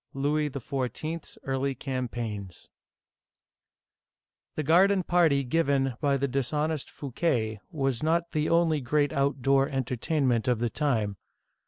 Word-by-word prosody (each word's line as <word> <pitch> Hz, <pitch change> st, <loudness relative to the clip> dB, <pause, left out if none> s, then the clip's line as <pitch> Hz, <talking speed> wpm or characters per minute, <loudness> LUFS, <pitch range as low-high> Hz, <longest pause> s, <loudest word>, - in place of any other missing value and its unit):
LOUIS 150 Hz, +2 st, +1 dB
XIV.'S 140 Hz, +5 st, -4 dB
EARLY 135 Hz, 0 st, -1 dB
CAMPAIGNS 120 Hz, -8 st, -5 dB, 1.9 s
THE 155 Hz, -, -1 dB
garden 185 Hz, +5 st, +4 dB
party 165 Hz, -6 st, +3 dB
given 135 Hz, -1 st, +1 dB
by 140 Hz, -2 st, +2 dB
the 140 Hz, +1 st, 0 dB
dishonest 150 Hz, +3 st, -1 dB
Fouquet 120 Hz, -6 st, -1 dB
was 135 Hz, -8 st, -1 dB
not 170 Hz, +2 st, +1 dB
the 155 Hz, 0 st, 0 dB
only 165 Hz, -3 st, +3 dB
great 145 Hz, +3 st, +1 dB
outdoor 140 Hz, 0 st, +2 dB
entertainment 130 Hz, -1 st, 0 dB
of 125 Hz, -2 st, +3 dB
the 120 Hz, 0 st, -1 dB
time. 110 Hz, -10 st, 0 dB
140 Hz, 115 wpm, -28 LUFS, 125-155 Hz, 1.9 s, garden